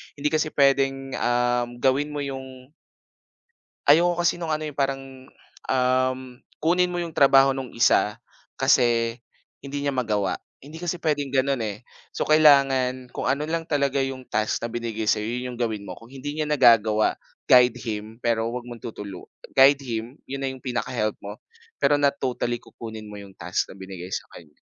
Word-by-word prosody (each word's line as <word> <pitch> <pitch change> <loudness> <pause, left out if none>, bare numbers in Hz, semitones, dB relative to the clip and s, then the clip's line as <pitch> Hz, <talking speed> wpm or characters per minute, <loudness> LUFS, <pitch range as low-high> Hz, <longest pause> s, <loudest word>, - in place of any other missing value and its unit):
hindi 150 +1 -1
kasi 155 0 0
puwedeng, 135 -1 +2
um, 120 0 +1
gawin 140 +3 +2
mo 145 - -2
'yong 130 -1 -8 1.2
Ayoko 170 +4 +5
kasi 175 0 +1
no’ng 165 - -3
ano, 155 - -7
eh,'yong 150 - -6
parang, 135 -1 0 0.7
um, 130 0 +2 0.4
kunin 180 +2 +2
mo 175 - -4
‘yong 170 -2 -4
trabaho 135 -1 +5
no’ng 135 -2 -5
isa, 105 -2 +3 0.4
kasi 120 -3 +2 0.4
hindi 140 +1 -5
niya 140 - 0
magawa. 105 -6 -1 0.2
Hindi 155 +5 -12
kasi 175 0 -2
puwedeng 150 -4 -1
gano’n, 135 -1 +1
eh. 105 -2 -3 0.3
So, - - -3
kailangan 135 -4 +4
kung - - -2
ano 140 +3 0
lang 165 +1 -3
talaga 140 -2 +1
‘yong 135 -1 -4
task 110 +1 -1
na 115 - -6
binigay 115 -2 -3
sa‘yo, 105 - +2
‘yon 125 +2 -4
‘yong 120 - -11
gawin 110 -3 -2
mo. - - -6
Kung 115 +1 -15
hindi 140 +2 -6
niya 155 -1 -2
nagagawa, 115 -6 +4 0.3
guide 125 -1 +6
him, 110 -1 -6
pero 115 -1 +1
huwag 120 0 -5
mong 120 -1 -9
tutulu 100 -5 -8 0.2
guide 140 +1 +6
him, 115 +3 -5
‘yon 140 +1 -5
na 135 - -1
‘yong 130 -1 -10
pinaka-help 120 -3 -1
mo. 105 +1 -8 0.4
Pero 145 0 +2
not 140 0 +2
totally 120 -2 -2
kukunin 110 -2 -10
mo 105 -1 -9
‘yong 100 -1 -14
task 90 +2 -2
na - - -11
binigay 95 -2 -8
sa - - -4
kaniya. 75 -3 -15
130 Hz, 175 wpm, -24 LUFS, 115-140 Hz, 1.2 s, guide